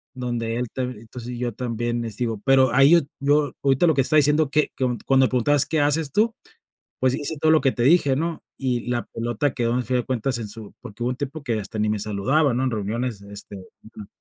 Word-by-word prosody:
donde 120 Hz, -2 st, -3 dB
él 125 Hz, 0 st, -2 dB
te 130 Hz, -, -3 dB
entonces, 120 Hz, 0 st, -7 dB
yo 120 Hz, -1 st, -3 dB
también 120 Hz, 0 st, -3 dB
este 115 Hz, +2 st, -4 dB
digo, 110 Hz, -3 st, -4 dB
pero 135 Hz, -1 st, +4 dB
ahí 135 Hz, +3 st, +6 dB
yo 170 Hz, -, +7 dB, 0.2 s
yo 145 Hz, +1 st, +2 dB
ahorita 135 Hz, +4 st, +3 dB
lo 160 Hz, -, +4 dB
que 135 Hz, -, +3 dB
estaba 155 Hz, +4 st, +2 dB
diciendo 150 Hz, 0 st, +3 dB
que 150 Hz, +1 st, +1 dB
co 125 Hz, -3 st, 0 dB
cuando 135 Hz, -1 st, +4 dB
preguntabas: 130 Hz, +3 st, +3 dB
"¿Qué 155 Hz, +1 st, 0 dB
haces 145 Hz, 0 st, +1 dB
tú?". 220 Hz, +5 st, +2 dB, 0.7 s
Pues 130 Hz, 0 st, +2 dB
hice 150 Hz, +2 st, -3 dB
todo 155 Hz, +1 st, +3 dB
lo 160 Hz, -, +5 dB
que 135 Hz, -2 st, +2 dB
te 120 Hz, -, -1 dB
dije, 140 Hz, -1 st, +4 dB
¿no? 165 Hz, +3 st, -2 dB, 0.2 s
Y 125 Hz, -3 st, -2 dB
la 120 Hz, -1 st, -1 dB
pelota 120 Hz, +4 st, -2 dB
quedó 120 Hz, -2 st, 0 dB
al 125 Hz, -, 0 dB
fin 125 Hz, +2 st, 0 dB
de 125 Hz, -, -1 dB
cuentas 130 Hz, -1 st, -1 dB
en 110 Hz, -, -5 dB
su 110 Hz, -1 st, -8 dB
porque 120 Hz, -1 st, -8 dB
hubo 120 Hz, -, 0 dB
un 125 Hz, -, -3 dB
tiempo 145 Hz, +2 st, -5 dB
que 115 Hz, -5 st, -1 dB
hasta 105 Hz, +2 st, -6 dB
ni 105 Hz, 0 st, +1 dB
me 105 Hz, -1 st, -1 dB
saludaba, 115 Hz, +8 st, +1 dB
¿no? 125 Hz, +2 st, 0 dB
En 130 Hz, -, 0 dB
reuniones, 110 Hz, +1 st, -3 dB
este 100 Hz, 0 st, -8 dB
ujú. 105 Hz, +2 st, -13 dB
125 Hz, 235 wpm, -23 LUFS, 115-140 Hz, 0.7 s, yo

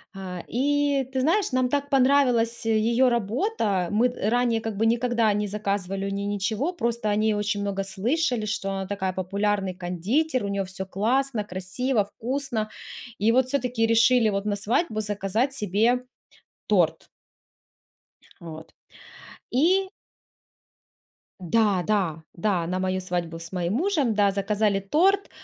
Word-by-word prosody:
А, 185 Hz, -2 st, -6 dB
и 285 Hz, +1 st, +1 dB
ты 260 Hz, -, 0 dB
знаешь, 355 Hz, +9 st, +2 dB
нам 255 Hz, -1 st, +1 dB
так 285 Hz, +1 st, -1 dB
понравилась 250 Hz, -4 st, +3 dB
её 230 Hz, +3 st, +3 dB
работа. 225 Hz, -, 0 dB
Мы 225 Hz, +4 st, +3 dB
ранее 240 Hz, 0 st, 0 dB
как 225 Hz, -1 st, -4 dB
бы 225 Hz, +3 st, +1 dB
никогда 235 Hz, -1 st, +2 dB
не 210 Hz, +1 st, -1 dB
заказывали 195 Hz, -1 st, -2 dB
у -, -, -2 dB
неё 200 Hz, +1 st, -3 dB
ничего. 205 Hz, -, -1 dB
Просто 235 Hz, -8 st, -1 dB
о 205 Hz, -, +1 dB
ней 215 Hz, 0 st, +2 dB
очень 205 Hz, 0 st, -1 dB
много 200 Hz, -1 st, -2 dB
слышали, 230 Hz, +5 st, -1 dB
что 205 Hz, -2 st, -2 dB
она 195 Hz, 0 st, -3 dB
такая 190 Hz, -2 st, -2 dB
популярный 195 Hz, 0 st, -1 dB
кондитер, 205 Hz, -, -1 dB
у -, -, -2 dB
неё 200 Hz, -1 st, -2 dB
всё 190 Hz, +1 st, -6 dB
классно, 235 Hz, +4 st, 0 dB
красиво, 205 Hz, +5 st, -1 dB
вкусно. 235 Hz, 0 st, -3 dB, 0.5 s
И 215 Hz, +3 st, +3 dB
вот 255 Hz, +1 st, +3 dB
всё-таки 250 Hz, -4 st, 0 dB
решили 230 Hz, 0 st, +4 dB
вот 200 Hz, 0 st, -2 dB
на 205 Hz, -1 st, 0 dB
свадьбу 220 Hz, -, 0 dB
заказать 210 Hz, +5 st, -1 dB
себе 230 Hz, +1 st, +1 dB, 0.6 s
торт. -, -, +1 dB, 1.3 s
Вот. 160 Hz, -1 st, -10 dB, 0.8 s
И 370 Hz, +8 st, +2 dB, 1.5 s
Да 195 Hz, +1 st, +2 dB
да 180 Hz, -7 st, 0 dB
да, 175 Hz, -2 st, 0 dB
на 180 Hz, +2 st, -2 dB
мою 185 Hz, 0 st, -1 dB
свадьбу 175 Hz, -2 st, -3 dB
с 165 Hz, 0 st, -9 dB
моим 180 Hz, +1 st, -1 dB
мужем, 295 Hz, -, +1 dB
да, 205 Hz, -1 st, +3 dB
заказали 200 Hz, +1 st, 0 dB
торт. 365 Hz, -, +2 dB
215 Hz, 140 wpm, -25 LUFS, 195-250 Hz, 1.5 s, решили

